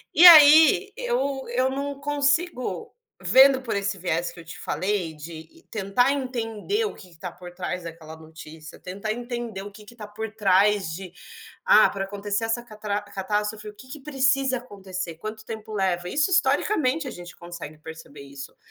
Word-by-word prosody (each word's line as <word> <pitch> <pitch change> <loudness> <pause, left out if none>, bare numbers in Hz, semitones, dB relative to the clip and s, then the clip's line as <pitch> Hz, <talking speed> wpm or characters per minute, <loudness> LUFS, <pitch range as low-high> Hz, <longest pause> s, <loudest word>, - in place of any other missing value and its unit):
E 350 - +8
aí 315 +4 +8
eu 280 - -1
eu 255 +2 +1
não 280 +1 -4
consigo, 290 +1 -1 0.3
vendo 260 +8 +6
por 235 - -3
esse 200 0 -2
viés 170 -1 -2
que 175 - -14
eu 165 - -12
te 165 - -10
falei 185 -5 -2
de 160 - -11
tentar 220 +5 +1
entender 255 - -2
o 425 - -4
que 185 - -14
que - - -19
está 180 +1 -6
por 175 0 -12
trás 180 -1 -4
daquela 160 -1 -9
notícia, 160 0 -12
tentar 200 +4 -5
entender 240 -4 -5
o 205 - -9
que 210 +1 -15
que 235 - -15
tá 215 -3 -9
por 220 +2 -6
trás 195 -2 +3
de 185 0 -8 0.5
"Ah, - - +6
para 195 -1 -4
acontecer 205 +2 -3
essa 235 +1 -1
catrá 210 -2 -4
catástrofe, 210 +2 -3
o 210 - -10
que 245 +5 -15
que 300 - -8
precisa 270 -2 +1
acontecer? 190 -7 -7
Quanto 215 +2 -7
tempo 220 -1 -8
leva?" 180 -3 -1
Isso 295 - +1
historicamente 320 -6 +1
a - - -5
gente 175 -4 -11
consegue 175 -3 -9
perceber 155 -2 -11
isso. 140 0 -10
210 Hz, 175 wpm, -24 LUFS, 180-260 Hz, 0.5 s, E